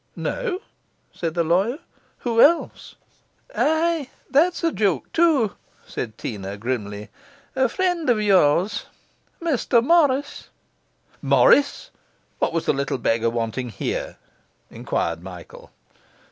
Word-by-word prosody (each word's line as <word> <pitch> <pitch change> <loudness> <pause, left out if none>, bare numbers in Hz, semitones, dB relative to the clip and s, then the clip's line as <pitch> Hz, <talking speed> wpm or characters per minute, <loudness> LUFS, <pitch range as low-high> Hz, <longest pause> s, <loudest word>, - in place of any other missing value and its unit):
'No?' 475 -7 -3 0.5
said 165 -1 -4
the 170 - +2
lawyer. 190 - +1 0.4
'Who 230 -2 +2
else?' 335 +3 +2 0.6
'Ay, 320 -2 +1 0.2
that's 340 +6 +2
a 330 - +2
joke, 195 - -1
too,' 310 - +3 0.3
said 110 -3 -6
Teena 100 -3 -6
grimly. 105 -2 -4 0.5
'A 260 -1 +2
friend 355 -1 -1
of 235 -3 +3
yours: 195 -1 +2 0.5
Mr 265 -7 +1
Morris.' 285 -2 +2 0.7
'Morris! 485 - +3 0.5
What - - +1
was 165 -1 -2
the - - +2
little 140 -1 -2
beggar 115 -1 +1
wanting 115 +2 -3
here?' - - -4 0.5
enquired 85 0 -2
Michael. 90 -2 -11
210 Hz, 110 wpm, -22 LUFS, -, 0.7 s, too